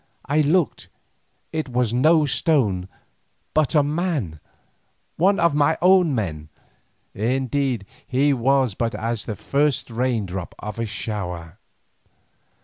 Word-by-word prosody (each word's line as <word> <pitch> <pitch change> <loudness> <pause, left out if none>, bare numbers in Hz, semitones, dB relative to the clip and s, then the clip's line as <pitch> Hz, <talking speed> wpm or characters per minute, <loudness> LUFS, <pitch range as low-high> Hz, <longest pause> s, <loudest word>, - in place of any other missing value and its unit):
I 150 +2 +2
looked; 155 +2 +1 0.7
it 155 -3 -2
was 120 -2 0
no 155 +5 +4
stone, 120 - +1 0.7
but 155 0 +2
a 150 - +5
man, 145 - -2 0.8
one 195 +4 +3
of 170 -2 +3
my 150 +2 +2
own 180 -5 +4
men. 75 -9 -3 0.6
Indeed 130 +1 -1 0.2
he 140 +2 +2
was 130 -2 +2
but 115 +3 -2
as 115 0 -3
the 110 - -4
first 140 +2 0
rain 120 -2 0
drop 90 -1 -6
of 105 +2 -7
a 115 - -1
shower. 95 -5 -5
130 Hz, 125 wpm, -22 LUFS, 105-150 Hz, 0.8 s, a